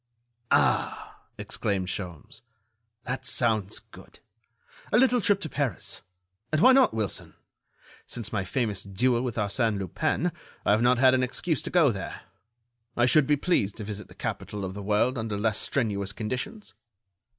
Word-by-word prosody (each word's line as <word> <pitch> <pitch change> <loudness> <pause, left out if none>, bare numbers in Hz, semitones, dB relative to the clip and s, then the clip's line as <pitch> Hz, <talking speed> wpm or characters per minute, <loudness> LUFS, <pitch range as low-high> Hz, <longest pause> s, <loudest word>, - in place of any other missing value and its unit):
"Ah!" - - +1 0.2
exclaimed 95 -2 -2
Sholmes, 90 -5 -6 0.6
"that 130 +1 -4
sounds 110 -6 +1
good... - - -14 0.7
a - - +4
little 250 -1 +4
trip 200 0 +3
to - - -3
Paris... 140 - -2 0.5
and 155 - +2
why 255 - +7
not, 260 0 +6
Wilson? 110 -5 -3 0.7
Since 115 -3 -4
my 100 -3 0
famous 105 -1 -1
duel 120 +5 +1
with 125 -3 -3
Arsène 110 +1 0
Lupin, 95 -3 -1 0.3
I - - +4
have 105 +2 +4
not 125 +1 +4
had 130 +1 +6
an 130 - +3
excuse 135 +5 -1
to - - -5
go 165 -7 +4
there. 100 -3 -6 0.8
I 120 - +4
should 135 +2 +5
be 150 - +3
pleased 135 - +1
to 110 - -5
visit 105 0 -6
the - - -16
capital 105 -2 -4
of 95 - -5
the 100 - -6
world 110 +5 +1
under 110 -2 -3
less 110 +1 0
strenuous 105 -6 -1
conditions." 130 - -5
115 Hz, 160 wpm, -27 LUFS, 100-130 Hz, 0.8 s, why